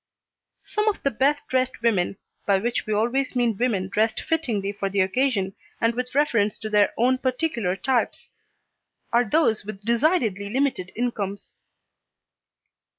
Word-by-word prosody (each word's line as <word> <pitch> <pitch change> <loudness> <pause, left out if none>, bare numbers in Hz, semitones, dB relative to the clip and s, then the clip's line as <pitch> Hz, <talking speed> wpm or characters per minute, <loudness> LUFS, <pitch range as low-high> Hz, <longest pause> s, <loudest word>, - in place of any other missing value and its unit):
Some 425 0 -1
of 425 - 0
the 275 - +2
best 285 +5 +1
dressed 255 -2 -1
women 195 -5 +1 0.3
(by 200 -1 +4
which 235 +3 -2
we 215 - 0
always 240 +6 0
mean 240 -3 +2
women 200 -4 0
dressed 220 +3 +1
fittingly 230 -12 -1
for 200 -1 -3
the 195 0 +1
occasion, 195 -1 +1 0.3
and 230 +1 +2
with 250 +2 -4
reference 230 -8 +2
to 215 -1 -6
their 210 -1 +4
own 255 +2 +3
particular 255 - -1
types) 245 +5 -1 0.8
are 235 -2 +3
those 225 -7 +2
with 205 -1 -9
decidedly 235 - +1
limited 255 -7 0
incomes. 210 -4 -3
230 Hz, 145 wpm, -24 LUFS, 200-260 Hz, 0.8 s, by